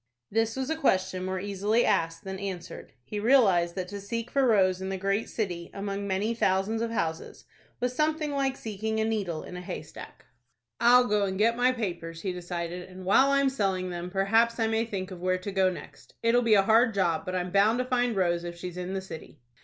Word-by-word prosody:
This 225 +1 +1
was 265 +3 -2
a - - +1
question 190 -10 +1
more 185 0 -2
easily 205 +4 +1
asked 165 -5 0
than 190 0 -6
answered. 190 -3 -7
He 210 - -5
realized 200 -8 +4
that 185 -2 -3
to 200 0 -6
seek 230 +3 -4
for 275 -2 +3
Rose 190 -4 +3
in 190 - -3
the 195 - -2
great 195 +3 -1
city, 175 -6 -3
among 200 0 -3
many 200 +4 0
thousands 205 +1 +1
of 230 - -1
houses, 165 -8 -3 0.3
was 250 0 -1
something 305 +1 0
like 275 -1 0
seeking 220 0 -3
a 220 - +1
needle 200 -8 -2
in - - -9
a 180 - -6
haystack. 180 - -9 0.5
"I'll 245 +1 +6
go 210 -3 +1
and 190 -1 -3
get 230 +3 +3
my 245 +1 +3
papers," 170 -8 -5
he 190 - -2
decided, 175 0 -5
"and 185 0 -10
while 265 +8 +5
I 275 0 +3
am 275 - +3
selling 190 -7 -1
them, 175 0 -5
perhaps 225 +5 +2
I 225 - +2
may 225 +1 +1
think 195 -4 -5
of 180 -2 -8
where 185 0 +1
to 185 +2 -6
go 190 -1 +3
next. - - -11
It'll 235 +1 +4
be 230 -3 +4
a 195 - +5
hard 225 +2 +4
job; 170 -4 +1
but 185 -1 -4
I'm 180 0 -2
bound 205 +4 +4
to 250 - -1
find 245 -2 +1
Rose 175 -2 +1
if 175 0 -6
she's 180 0 -7
in 180 +1 -4
the 190 - -2
city." 160 -5 -10
195 Hz, 225 wpm, -28 LUFS, 185-230 Hz, 0.5 s, I'll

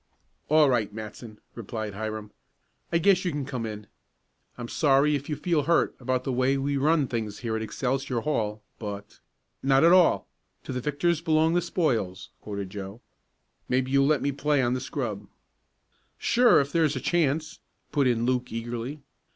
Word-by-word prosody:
"All 155 0 +6
right, 120 -6 +1
Matson," 110 +1 -9
replied 110 -2 -5
Hiram. 110 0 -5 0.6
"I 170 - +3
guess 185 +2 +3
you 180 - 0
can 145 -4 -3
come 125 -4 -4
in. 105 -1 -7 0.7
I'm 120 -1 -6
sorry 145 +2 +3
if 145 0 -3
you 150 - -1
feel 170 -1 +1
hurt 170 +2 +2
about 130 0 -1
the 135 - -2
way 130 +2 +2
we 140 +1 -1
run 150 +2 +3
things 110 -4 -4
here 115 -2 -2
at 110 - -2
Excelsior 125 +2 -2
Hall, 110 -7 -2 0.2
but 100 -2 -7 0.2
" - - -50
"Not 135 +2 +5
at 170 - +7
all 180 -2 +4 0.4
'to - - -6
the 125 - -3
victors 150 +4 0
belong 160 0 +2
the 175 - +2
spoils,'" 110 - -1
quoted 100 -2 -5
Joe. 100 +2 -7 0.7
"Maybe 130 +1 +1
you'll 140 0 +4
let 150 -3 +2
me 140 - +1
play 145 +1 +1
on 120 0 +1
the 130 - -2
scrub." 110 -9 -4 0.9
"Sure, 245 +1 +4
if 140 0 -1
there's 155 -2 +2
a - - -2
chance," 155 0 0 0.3
put 145 -3 +2
in 120 -1 +1
Luke 125 0 0
eagerly. 120 +5 -5
130 Hz, 175 wpm, -26 LUFS, 110-150 Hz, 0.9 s, at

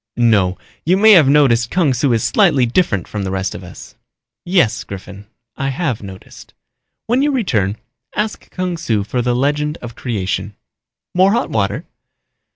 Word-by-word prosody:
"No, 105 -6 +3 0.3
you 180 +4 +2
may 220 +2 +6
have 165 -9 +7
noticed 125 -6 +3
Kung 170 -7 +2
Su 125 +2 +1
is 115 -2 +1
slightly 160 - +3
different 115 - 0
from 105 -2 -4
the 95 - -3
rest 95 0 -2
of 90 - -8
us." 90 - -12 0.5
"Yes, 175 - +1
Griffin, 100 +1 -10 0.3
I 135 - -1
have 135 -4 -2
noticed. 95 -2 -12 0.5
When 245 +4 +1
you 290 +1 +2
return 110 - 0 0.4
ask 215 +1 -3
Kung 180 -2 -3
Su 110 -10 -1
for 115 +5 -2
the 120 0 0
legend 150 +4 0
of 120 -1 -9
creation. 105 -3 -3 0.6
More 190 +3 +4
hot 235 - -1
water?" 100 -2 -1
125 Hz, 165 wpm, -17 LUFS, -, 0.6 s, have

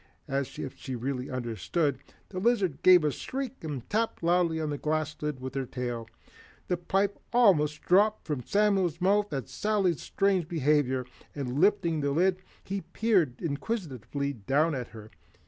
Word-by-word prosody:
As 135 -2 -2
if 135 - -5
she 130 -2 -6
really 125 +2 -3
understood, 125 - -1 0.3
the 185 - -4
lizard 200 - +1
gave 180 -3 +7
a 150 - +2
squeak 265 - -5
and 145 -6 -5
tapped 220 -3 -1
loudly 170 -1 +2
on 155 -2 -2
the 145 - -2
glass 155 0 -1
lid 150 -3 -2
with 130 0 -6
her 135 -1 -2
tail. 120 -3 -4 0.6
The 180 - +1
pipe 195 +3 0
almost 165 -11 +4
dropped 210 +4 +3
from 150 -5 -2
Samuel's 195 - +2
mouth 200 +3 +2
at 135 -5 -3
Sally's 200 -5 0
strange 195 -4 +1
behavior, 145 -5 +1 0.3
and 135 -1 -3
lifting 170 -4 +3
the 140 - 0
lid 180 +5 +2 0.2
he 195 0 -3
peered 185 - +1
inquisitively 140 - -3
down 140 +8 +1
at 125 -4 -3
her. 110 -1 -12
155 Hz, 160 wpm, -29 LUFS, 135-190 Hz, 0.6 s, gave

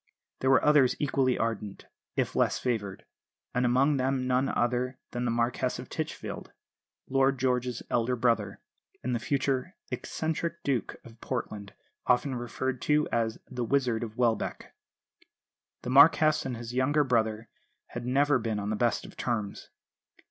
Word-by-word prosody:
There 130 - +1
were 135 - +5
others 150 -4 +5
equally 135 -3 +1
ardent, 110 -3 -3 0.3
if - - -1
less - - +2
favoured; 105 -6 -3 0.5
and 125 0 +2
among 135 +4 +3
them 130 0 0
none 130 +1 +2
other 125 +2 0
than 120 0 -2
the - - +1
Marquess 120 +1 0
of - - -8
Titchfield, - - -5 0.6
Lord 135 0 +2
George's 125 -1 0
elder 120 +1 +1
brother, 115 -5 0 0.4
and 125 - -1
the 120 - 0
future 135 +6 -1 0.2
"eccentric 165 +1 -3
Duke" 135 -4 -1
of 115 -1 -15
Portland, 105 -5 -5 0.3
often 130 +2 +3
referred 125 +1 -3
to 150 0 +2
as 115 -1 0
"The 125 -2 -4
Wizard 125 -2 +1
of 110 -2 -6
Welbeck." 115 -3 -1 1.1
The 125 - -3
Marquess 155 +1 +6
and 125 -3 -4
his 120 +1 -7
younger 145 +4 +3
brother 110 -3 0 0.4
had 120 - -6
never 140 +2 +3
been 110 -2 -2
on 100 +1 -3
the - - 0
best 120 +2 0
of - - -12
terms. 110 -5 -3
125 Hz, 150 wpm, -29 LUFS, 115-135 Hz, 1.1 s, Marquess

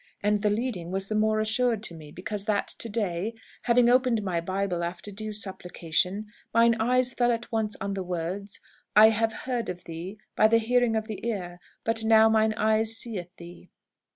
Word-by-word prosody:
And 210 0 +2
the 210 - +2
leading 205 -5 -2
was 195 +1 -2
the 215 - -1
more 215 0 +2
assured 225 0 +1
to 175 - -5
me, 155 -2 -11
because 200 +4 -5
that 210 -2 0
to 230 - -3
day, 205 0 -2 0.3
having 240 0 +4
opened 245 -3 +3
my 175 -4 -1
Bible 185 0 -2
after 175 +4 -5
due 215 +2 -5
supplication, 190 -1 -2 0.3
mine 230 0 +6
eyes 250 +2 +2
fell 240 -1 +2
at 235 +1 -3
once 220 -2 -1
on 200 0 -3
the 195 - -3
words, 180 +3 -4 0.4
'I 215 +1 +9
have 225 0 0
heard 245 -3 -2
of 180 -1 -6
thee 170 +5 -7 0.2
by 215 - +5
the 230 +1 +4
hearing 240 0 +2
of 220 -1 -1
the 210 -4 -6
ear; 180 -6 -4 0.2
but 225 0 +1
now 220 0 +6
mine 220 0 +3
eyes 220 +1 +1
seeth 205 -7 -4
thee.' 175 +1 -12
215 Hz, 190 wpm, -27 LUFS, 185-225 Hz, 0.4 s, I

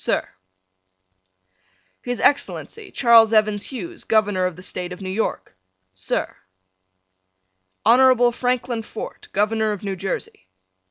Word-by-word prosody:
Sir: - - 0 1.7
His 245 -1 -4
Excellency, 395 +8 0
Charles 230 -3 +5
Evans 215 -2 +2
Hughes, 335 +6 -7
Governor 205 -4 +2
of 180 - -6
the 180 - -12
State 180 -1 -5
of 180 - -8
New 190 -1 -5
York. 220 - -3 0.4
Sir: 95 0 -3 1.5
Honorable 245 +1 +5
Franklin 245 -1 -1
Fort, 220 - -8
Governor 215 +1 +1
of 205 - -8
New 195 -1 -3
Jersey. 180 - -5
220 Hz, 115 wpm, -22 LUFS, 195-245 Hz, 1.7 s, Charles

